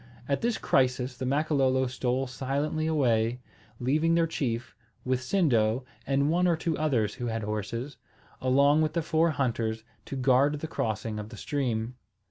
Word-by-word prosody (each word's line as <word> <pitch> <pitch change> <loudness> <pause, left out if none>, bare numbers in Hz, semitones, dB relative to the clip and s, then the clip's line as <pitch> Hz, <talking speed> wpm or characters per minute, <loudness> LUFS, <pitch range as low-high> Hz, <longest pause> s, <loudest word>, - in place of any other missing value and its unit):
At 140 - 0
this 235 0 0
crisis 125 -1 +1
the 130 +1 -4
Makololo 135 -2 +2
stole 130 +1 -1
silently 140 +5 -2
away, 120 -6 +1 0.4
leaving 155 +7 +2
their 170 -1 +3
chief, 130 -6 -3 0.3
with 130 0 0
Sindo 125 - +2 0.2
and 140 +2 +2
one 180 +2 +3
or 170 - +3
two 165 -1 -1
others 120 -10 +1
who 120 -2 -4
had 115 -1 -2
horses, 110 +6 -4 0.4
along 140 +4 +4
with 155 0 0
the 170 -1 0
four 165 +1 +2
hunters, 115 -6 -1 0.2
to - - -6
guard 135 +3 +3
the 160 - -4
crossing 110 -6 -3
of 105 0 -7
the 110 - -10
stream. 125 -4 -2
130 Hz, 160 wpm, -28 LUFS, 120-150 Hz, 0.4 s, along